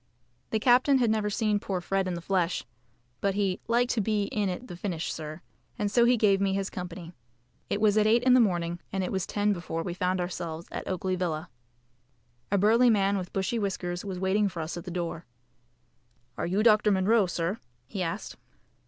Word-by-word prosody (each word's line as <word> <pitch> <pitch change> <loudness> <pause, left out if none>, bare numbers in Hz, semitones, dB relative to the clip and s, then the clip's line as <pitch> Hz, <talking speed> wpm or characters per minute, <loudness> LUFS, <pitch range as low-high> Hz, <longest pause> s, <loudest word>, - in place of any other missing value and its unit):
The 220 - +1
captain 255 +4 +5
had 240 -4 +2
never 215 -1 0
seen 210 0 +1
poor 190 -2 -3
Fred 195 +1 -1
in 180 - -2
the 170 - -5
flesh, 180 -2 0 0.5
but 200 -1 0
he 195 -3 0
"liked 240 +2 +2
to 225 - +1
be 210 0 +1
in 205 -2 0
at 185 +7 -5
the 175 - -7
finish, 175 -3 -3
sir," 155 +1 -7 0.4
and 205 -3 -1
so 235 +2 +5
he 245 0 +4
gave 200 -3 +3
me 195 -1 +2
his 195 0 -2
company. 175 -1 -7 0.6
It - - 0
was 210 -1 +3
at 210 - +3
eight 230 +2 +4
in 255 0 +5
the 255 - +7
morning, 175 -6 +1
and 195 -1 -1
it - - -3
was 190 -2 -2
ten 205 0 +1
before 165 -2 -4
we 175 - -3
found 185 0 0
ourselves 170 -2 -4
at - - -5
Oakley 185 0 -1
Villa. 170 -5 -3 1.0
A 200 - +3
burly 230 +5 +5
man 200 -2 +3
with 185 -3 -4
bushy 195 +4 -1
whiskers 180 -3 -3
was 195 -3 -5
waiting 195 +2 +1
for 170 -3 -5
us 160 - -5
at 175 - -7
the - - -5
door. 170 -1 -4 1.1
"Are - - -2
you 195 +4 +1
Dr. 215 -2 +5
Munro, 200 +1 +3
sir?" 175 +4 -2 0.3
he 185 +10 -5
asked. 175 +4 -4
195 Hz, 205 wpm, -28 LUFS, 175-210 Hz, 1.1 s, the